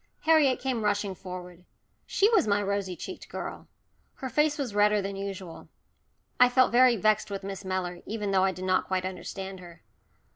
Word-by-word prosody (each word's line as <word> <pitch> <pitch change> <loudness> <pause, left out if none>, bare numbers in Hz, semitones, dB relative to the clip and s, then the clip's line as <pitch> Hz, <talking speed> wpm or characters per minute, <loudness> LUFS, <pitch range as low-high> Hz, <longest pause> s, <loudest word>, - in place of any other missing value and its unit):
Harriet 310 -5 +4
came 250 -4 -2
rushing 205 -1 0
forward. 180 -1 -9 0.4
She 400 - +3
was 435 - +4
my 200 0 +3
rosy 200 -2 -2
cheeked 370 - -8
girl! - - -6 0.5
Her 260 - -5
face 300 +3 +2
was 265 -7 -3
redder 210 0 +4
than 195 0 -4
usual. 195 -3 -7 0.7
I 250 0 +7
felt 255 0 +4
very 245 0 +6
vexed 215 0 +2
with 195 -1 -5
Miss 195 0 -6
Mellor, 185 -2 -3
even 210 -2 -3
though 190 -1 +3
I 190 - +3
did 185 0 -7
not 185 0 +1
quite 185 -1 -1
understand 190 +1 -6
her. 175 -2 -13
200 Hz, 180 wpm, -28 LUFS, 185-235 Hz, 0.7 s, I